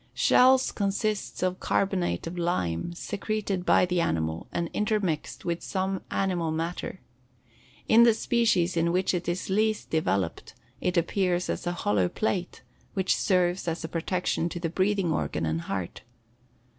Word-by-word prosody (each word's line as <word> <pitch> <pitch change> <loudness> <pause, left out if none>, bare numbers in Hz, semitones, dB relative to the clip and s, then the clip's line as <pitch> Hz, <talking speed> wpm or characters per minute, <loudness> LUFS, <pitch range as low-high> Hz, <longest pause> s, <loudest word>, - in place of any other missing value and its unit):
Shells 260 +1 +5
consist 205 0 -2
of 185 0 0
carbonate 185 - 0
of 165 +2 -5
lime 170 - -1
secreted 200 0 -3
by - - +5
the 180 -1 0
animal 80 - -1
and 170 - -1
intermixed 210 -7 -1
with 170 0 -1
some 190 -1 -2
animal 180 -4 0
matter. 165 +3 -3 0.9
In 225 - +7
the 235 -2 +6
species 220 -8 +2
in 170 0 +2
which 185 +2 +1
it 175 -1 -2
is 180 +2 -3
least 215 +2 0
developed 100 - -1 0.2
it 180 0 -1
appears 180 +1 +1
as - - -4
a 175 - 0
hollow 100 -3 +2
plate, 185 - -2 0.3
which 190 -1 +2
serves 180 -1 +1
as 165 0 -2
a - - -3
protection 170 +1 -1
to 175 - -5
the 170 -1 -2
breathing 190 0 +1
organ 120 - -1
and 80 +1 -1
heart. 95 -1 -4
180 Hz, 150 wpm, -27 LUFS, 165-195 Hz, 0.9 s, In